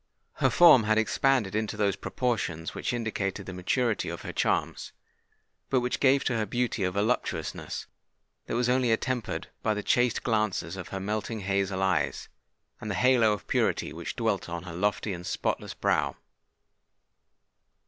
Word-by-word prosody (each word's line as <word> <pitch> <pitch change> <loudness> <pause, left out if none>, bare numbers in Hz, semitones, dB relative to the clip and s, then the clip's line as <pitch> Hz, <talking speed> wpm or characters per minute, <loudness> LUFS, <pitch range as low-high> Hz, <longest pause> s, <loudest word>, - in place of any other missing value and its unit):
Her - - +3
form 155 -10 +7
had 110 0 +3
expanded 115 -1 +2
into 110 0 -2
those 100 -3 +1
proportions 95 -9 -2
which - - -2
indicated 105 -5 -2
the 95 - -7
maturity 105 +5 0
of - - -6
her - - -6
charms, - - -1 0.8
but 130 - +2
which 125 0 -1
gave 135 0 +4
to 125 - 0
her 110 -1 -1
beauty 120 -1 -1
a 90 - +2
voluptuousness 105 +6 -2 0.6
that - - -2
was 120 0 +1
only 125 -1 +2
attempered 120 0 -2
by 110 -1 +1
the 105 - -3
chaste 120 -1 +2
glances 105 -6 0
of 90 -2 -7
her 95 - -5
melting 105 +2 -3
hazel 100 -1 0
eyes, 90 -7 0 0.5
and 110 - -6
the 100 - -1
halo 125 -4 +4
of 105 - -6
purity - - 0
which 85 +1 -6
dwelt 110 -7 -1
on 85 0 -4
her 90 -3 -8
lofty 100 +2 0
and 90 0 -7
spotless - - -2
brow. - - +1
110 Hz, 160 wpm, -28 LUFS, 95-120 Hz, 0.8 s, form